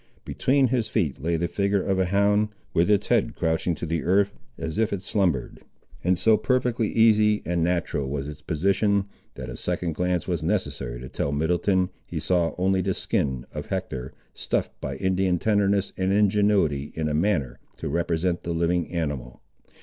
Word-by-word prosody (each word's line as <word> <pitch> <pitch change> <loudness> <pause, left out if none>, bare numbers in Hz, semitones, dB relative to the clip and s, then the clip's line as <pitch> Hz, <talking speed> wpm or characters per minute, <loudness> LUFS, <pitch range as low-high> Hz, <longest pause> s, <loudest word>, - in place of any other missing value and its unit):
Between 135 -1 +2
his 120 -3 0
feet 75 - -1
lay 85 +3 0
the 85 +2 0
figure 100 +2 0
of 95 -1 0
a 95 - +3
hound, 100 +2 +2 0.2
with 85 +2 +3
its 105 -1 +3
head - - +2
crouching 80 +1 0
to 80 - -5
the 80 0 -1
earth 100 +3 +2 0.2
as 80 +6 -4
if 110 -1 +2
it 95 -2 -3
slumbered; 90 - 0 0.4
and 90 +1 +2
so 110 +4 +5
perfectly 125 -3 0
easy 110 -2 +4
and 85 -1 0
natural 85 -5 -1
was 70 0 -3
its 75 0 -8
position, 100 +5 +1 0.3
that - - -7
a - - -6
second 85 -2 -2
glance 90 +1 -1
was 85 -3 -1
necessary - - -2
to 65 - -7
tell 70 - -2
Middleton, 90 +5 +1
he - - -5
saw 85 -2 +1
only 95 +1 +2
the 95 0 -1
skin 65 -3 -1
of - - -5
Hector, 65 0 -4 0.2
stuffed - - -1
by 65 - -4
Indian 95 +3 +1
tenderness 100 0 +1
and 95 0 0
ingenuity 100 -8 +2
in 80 -1 -1
a 75 - -1
manner 80 -6 0 0.2
to - - -5
represent 85 +2 0
the 85 - -3
living 85 +1 0
animal. 75 -8 -3
90 Hz, 180 wpm, -25 LUFS, 80-100 Hz, 0.4 s, so